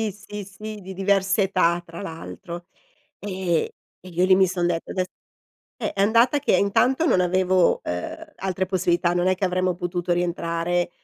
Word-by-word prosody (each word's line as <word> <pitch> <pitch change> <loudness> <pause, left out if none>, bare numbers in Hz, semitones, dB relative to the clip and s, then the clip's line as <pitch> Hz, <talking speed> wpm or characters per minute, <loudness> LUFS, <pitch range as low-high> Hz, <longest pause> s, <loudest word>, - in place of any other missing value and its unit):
sì, 220 -2 0
sì, 205 +1 -8
sì 210 +2 -8
di 190 0 -8
diverse 195 +1 +2
età 180 -3 +2
tra 165 0 -9
l'altro. 170 - -8 0.5
Ehm, 185 -4 -1 0.4
e - - -11
io 180 +1 +2
lì 185 0 +6
mi 190 0 +5
son 175 -1 -1
detta 170 -1 -1
ades 185 -1 0 0.7
eh, - - -3
è 195 - -8
andata 235 +7 +4
che 285 - +2
intanto 250 - +2
non 240 - +3
avevo, 185 0 +3
Uhm, 90 0 -5
altre 190 0 -1
possibilità 175 -2 +1
non 175 +1 +1
è 185 - +3
che 195 - -6
avremmo 185 0 +1
potuto 175 0 -1
rientrare 175 0 -1
185 Hz, 175 wpm, -24 LUFS, 175-195 Hz, 0.7 s, lì